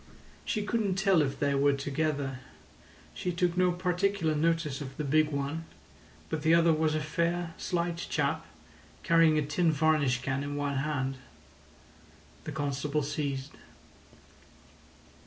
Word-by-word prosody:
"She 215 -4 -1
couldn't 205 -3 0
tell 195 -3 +3
if 140 -2 -1
they 140 -1 +1
were 140 +1 +3
together. 140 -1 -2 0.7
She 180 - -3
took 175 0 0
no 180 0 +3
particular 180 -1 0
notice 155 -2 0
of 135 -1 -7
the 150 - -2
big 155 +2 +3
one, 145 +3 -3 0.6
but 160 -2 -3
the 160 +2 +5
other 170 -1 +5
was 155 0 +1
a - - +1
fair, 170 +2 -1
slight 170 -1 -1
chap, - - -1 0.6
carrying 165 -2 +5
a 150 - +1
tin 160 +3 +2
varnish 145 -5 +2
can 135 +1 -1
in 145 0 -4
one 145 -1 -1
hand." 135 -2 -1 1.3
The 155 - -4
constable 145 0 -1
ceased. 140 -2 -3
155 Hz, 140 wpm, -29 LUFS, 140-170 Hz, 1.3 s, the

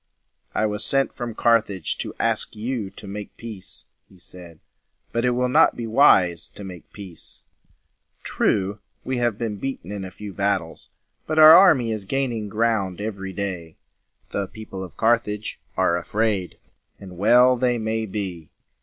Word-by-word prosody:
"I 110 - +2
was 105 0 -1
sent 135 +4 +1
from 120 -3 -5
Carthage 110 -7 +1
to - - -5
ask - - -1
you 110 -2 -3
to 105 - -13
make 105 +1 -7
peace," 100 -5 -7 0.2
he 95 - -19
said. 85 -2 -8 0.5
"But 115 +1 0
it - - +4
will 125 +1 +1
not 125 - +4
be 120 - -4
wise 105 - +4
to 100 - -7
make 90 -3 -10
peace. 95 -5 -7 0.8
True, 100 +1 0 0.2
we 130 -1 -2
have 120 -4 0
been 110 -3 -3
beaten 115 -6 -5
in 100 -2 -5
a 95 - -6
few 105 +1 -9
battles, 100 -4 -2 0.4
but 155 - -2
our 155 +1 +11
army 145 -12 +6
is 105 -3 -4
gaining 120 -3 -2
ground 105 -4 0
every 100 -2 -4
day. 90 -4 -5 0.5
The 100 -1 -2
people 105 -3 -8
of 90 - -11
Carthage 110 -2 0 0.2
are 85 - +3
afraid, 100 +1 -1 0.4
and 95 -2 -10
well 125 +7 +5
they 125 -1 +1
may 110 0 -2
be. 95 -6 -5
105 Hz, 160 wpm, -23 LUFS, 95-115 Hz, 0.8 s, our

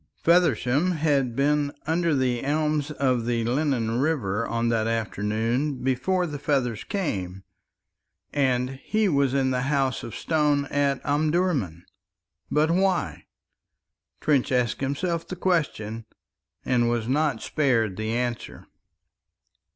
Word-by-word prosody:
Feversham 165 -1 +3
had 145 -6 +1
been 145 +1 +1
under 165 0 +1
the 125 -3 0
elms 150 +1 0
of 130 -5 0
the 120 -1 0
Lennon 120 -2 0
River 115 -8 0
on 115 0 0
that 115 -1 +1
afternoon 115 +5 -1
before 135 +9 +1
the 150 -4 -5
feathers 130 -7 0
came, 95 - -3 0.9
and 130 -2 0
he 215 -1 +1
was 140 -5 +2
in 135 -1 +2
the 125 0 0
House 135 -3 0
of 115 - -7
Stone 150 -3 +1
at 140 -2 0
Omdurman. 145 - 0 0.6
But 155 +2 +2
why? 180 - 0 0.9
Trench 140 -5 +1
asked 125 -2 0
himself 165 +5 -2
the 185 - -5
question 125 - -1 0.6
and 120 -2 +2
was 120 -2 -1
not 140 -3 0
spared 115 -9 +1
the 110 +2 -3
answer. 120 +1 -3
135 Hz, 120 wpm, -25 LUFS, 115-150 Hz, 0.9 s, Feversham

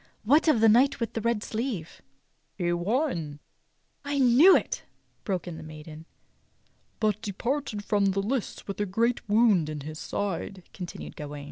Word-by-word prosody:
^ - - -30 0.2
What 290 +10 +4
of 260 -8 +4
the 225 - +6
knight 245 +6 +4
with 230 -2 -3
the 225 - -2
red 230 -1 0
sleeve.^" 220 -8 -4 0.6
"He 175 -2 0
won 175 - -1 0.2
— - - -45
" - - -45
"I 285 - 0
knew 270 +8 +7
it!" - - -4 0.4
broke 185 -3 -2
in 170 -2 -6
the - - -8
maiden. 155 +1 -10 0.3
" - - -41
— - - -41
but 215 -1 0
departed 225 +1 -3
from 205 -2 +2
the 195 0 +1
lists 225 +4 -3
with 200 +1 -4
a 205 - 0
great 230 +6 +1
w^ound 205 -7 +3
in 150 -1 -5
his 155 +2 -7
side," 195 -1 -4
continued 180 -3 -8
Gawain. 145 -1 -7
205 Hz, 190 wpm, -27 LUFS, 175-235 Hz, 0.6 s, knew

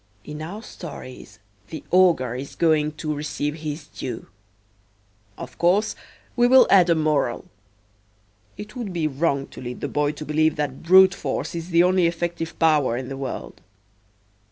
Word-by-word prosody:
In 150 +1 -8
our 195 +8 -7
stories 145 - -10 0.3
the 160 - -8
ogre 170 -10 +4
is 130 +3 -7
going 155 -2 +2
to 155 0 -4
receive 150 0 -3
his 155 0 -6
due. 120 -5 -7 1.1
Of - - -10
course, 190 +5 +2 0.4
we 240 0 +4
will 260 +1 +7
add 185 -3 +6
a 170 - +4
moral. 150 -6 0 1.1
It 210 +3 -9
would 230 -7 -5
be 165 -3 -1
wrong 140 -1 -1
to - - -11
lead 125 -1 -6
the - - -3
boy 145 0 0
to 150 +1 -8
believe 155 +1 +1
that 145 -3 -3
brute 190 +2 +6
force - - -4
is 170 +1 -6
the 170 0 +4
only 180 -1 +3
effective 170 -1 -4
power 150 -7 +2
in 125 0 -5
the 135 - -5
world. 135 -1 -6
155 Hz, 160 wpm, -23 LUFS, 145-175 Hz, 1.1 s, will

